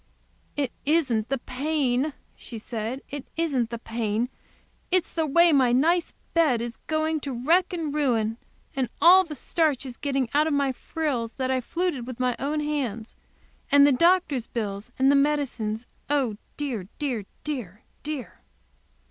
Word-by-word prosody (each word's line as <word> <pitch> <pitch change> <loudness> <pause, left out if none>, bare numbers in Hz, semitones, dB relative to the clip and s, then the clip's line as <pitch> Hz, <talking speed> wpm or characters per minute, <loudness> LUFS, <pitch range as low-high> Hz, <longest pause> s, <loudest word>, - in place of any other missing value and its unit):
"It 275 -4 0
isn't 275 -8 +1
the 275 - +1
pain," 270 +1 0 0.2
she 235 - -8
said, 230 +4 -4
"it 285 -2 -6
isn't 275 -8 +1
the 235 - -4
pain. 225 0 -2 0.6
It's 370 -1 +1
the 320 -2 0
way 340 +4 +5
my 260 -5 +4
nice 335 +7 +2 0.2
bed 310 -8 +3
is 235 0 -5
going 315 0 0
to 280 -1 -5
wreck 355 +4 +4
and 325 -5 -3
ruin, 230 -7 +1 0.4
and 260 -3 0
the 350 -2 +6
starch 300 -4 0
all 260 - -5
getting 275 -3 0
out 300 +2 +4
of 315 - 0
my 280 -1 +2
frills 255 -4 -3
that 260 -1 -1
I 260 -1 +1
fluted 325 -3 -2
with 255 -2 -7
my 250 -1 +1
own 300 +2 -1
hands. 255 -7 -3 0.6
And 285 0 +8
the 290 - +5
doctor's 320 -4 +3
bill, 205 -4 -3 0.2
and 265 +1 +5
the - - +5
medicines; 265 -6 0 0.2
oh, 265 -8 +1 0.2
dear, 245 -11 -3
dear, 250 -9 -2 0.2
dear!" 235 - -5
275 Hz, 155 wpm, -26 LUFS, 240-305 Hz, 0.6 s, And